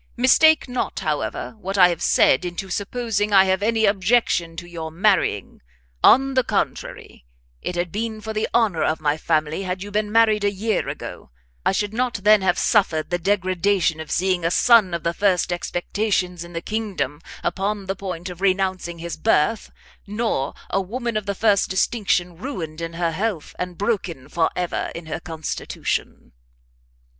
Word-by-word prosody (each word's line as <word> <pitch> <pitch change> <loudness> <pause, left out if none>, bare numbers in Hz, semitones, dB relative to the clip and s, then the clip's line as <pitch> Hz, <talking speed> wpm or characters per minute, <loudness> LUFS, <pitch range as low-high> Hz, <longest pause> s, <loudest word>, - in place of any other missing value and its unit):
Mistake 310 +6 +5
not, 250 0 -3
however, - - -3
what 195 0 -4
I 180 -2 +7
have 170 -2 -3
said 130 - +4
into 180 +2 -5
supposing 210 +1 -1
I 195 -1 +7
have 190 0 +1
any 220 +1 +2
objection 195 -4 +2
to 170 - -6
your 165 -2 -6
marrying; 175 - 0 0.4
on 270 +1 +6
the 260 -1 +3
contrary, - - -3 0.4
it 180 - -4
had 175 -1 -2
been 220 +2 -3
for 220 +1 -6
the 215 0 -1
honour 210 -9 +2
of 155 +1 +1
my 150 -1 +1
family 155 +1 0
had 185 0 -3
you 205 - -8
been 210 0 -1
married 220 -2 +4
a 205 - +3
year 205 +1 -1
ago - - -7 0.3
I - - +3
should 205 +2 -1
not 245 +1 -1
then 210 0 +6
have 180 -2 +2
suffered 175 -7 +1
the 175 - 0
degradation 185 -2 +1
of 160 - -7
seeing 185 -1 0
a 165 - +2
son 210 -2 +4
of 170 - -5
the 170 - 0
first 180 -2 +1
expectations 180 0 -2
in 175 0 -12
the 165 - -3
kingdom 200 -9 -3 0.2
upon 200 +1 -2
the 195 +1 -2
point 185 -3 -6
of 180 +1 -11
renouncing 185 -2 0
his 170 0 -6
birth, 215 0 +1 0.4
nor 210 - -1 0.2
a 195 - +1
woman 235 +4 -4
of 215 -2 -2
the 200 - -1
first 205 -1 +2
distinction 190 -3 0
ruined 170 - -6
in 165 0 -4
her 170 0 -1
health, 190 -1 -3
and 180 -1 -4
broken 190 - -2
for 165 +1 +1
ever 180 -1 -2
in 170 - -7
her 155 - -4
constitution." 160 -3 -4
190 Hz, 175 wpm, -22 LUFS, 170-215 Hz, 0.4 s, I